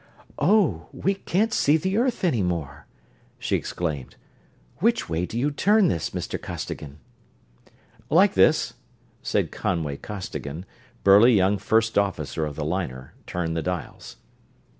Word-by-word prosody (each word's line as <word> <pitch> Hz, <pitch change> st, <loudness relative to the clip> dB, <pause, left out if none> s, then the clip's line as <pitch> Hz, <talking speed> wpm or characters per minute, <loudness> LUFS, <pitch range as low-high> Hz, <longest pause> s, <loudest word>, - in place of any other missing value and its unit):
"Oh, 150 Hz, -, +2 dB
we 195 Hz, -, 0 dB
can't 200 Hz, +3 st, 0 dB
see 150 Hz, +2 st, +4 dB
the 190 Hz, +5 st, -2 dB
earth 250 Hz, -3 st, 0 dB
any 155 Hz, -, +2 dB
more!" 80 Hz, -6 st, -3 dB, 0.5 s
she -, -, -1 dB
exclaimed. 75 Hz, -7 st, -3 dB, 0.6 s
"Which 230 Hz, +6 st, +1 dB
way 85 Hz, +1 st, -1 dB
do 115 Hz, -, -5 dB
you 140 Hz, +5 st, +1 dB
turn 205 Hz, +6 st, +3 dB
this, 85 Hz, -, -1 dB
Mr. -, -, -4 dB
Costigan?" 70 Hz, -1 st, -6 dB, 1.1 s
"Like -, -, +5 dB
this," -, -, +3 dB, 0.6 s
and -, -, +1 dB
Conway 80 Hz, -6 st, -2 dB
Costigan, 90 Hz, -5 st, -6 dB, 0.4 s
burly 105 Hz, +5 st, +7 dB
young 100 Hz, +1 st, +3 dB
first 110 Hz, +2 st, +2 dB
officer 95 Hz, -5 st, -2 dB
of 75 Hz, -, -7 dB
the 75 Hz, -, -3 dB
liner, 75 Hz, -7 st, -4 dB
turned 80 Hz, -2 st, -2 dB
the 80 Hz, -, -1 dB
dials. 90 Hz, -2 st, -5 dB
95 Hz, 135 wpm, -24 LUFS, -, 1.1 s, burly